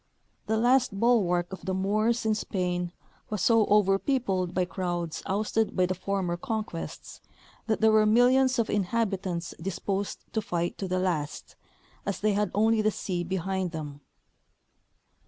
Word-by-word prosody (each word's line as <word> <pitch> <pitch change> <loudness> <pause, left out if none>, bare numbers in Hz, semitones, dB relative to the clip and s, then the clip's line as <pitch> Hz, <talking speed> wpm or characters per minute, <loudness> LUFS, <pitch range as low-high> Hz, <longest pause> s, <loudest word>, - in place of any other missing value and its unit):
The 220 - +1
last 240 -3 +3
bulwark 190 -7 +2
of 190 - -8
the 190 -1 -1
Moors 215 +5 +1
in 220 - +3
Spain 180 -4 -2 0.4
was 210 -3 -2
so 225 -2 +4
over 200 -2 +4
peopled 195 -10 0
by 185 0 0
crowds 175 -2 -3
ousted 215 +2 0
by 185 - +3
the 185 - -1
former 185 -1 -2
conquests 215 -3 -5 0.5
that 220 -1 0
there 220 0 +6
were 215 0 +5
millions 255 +3 +4
of 230 -2 +1
inhabitants 195 -4 -1
disposed 195 +2 -3
to 220 - 0
fight 175 -3 -2
to 195 - -2
the 185 0 -1
last, 165 -6 -2 0.5
as 200 - -3
they 210 0 +2
had 205 -1 +1
only 220 +1 +3
the 215 - +3
sea 180 -4 -3
behind 190 0 -2
them. 145 -3 -6
195 Hz, 155 wpm, -28 LUFS, 180-220 Hz, 0.5 s, there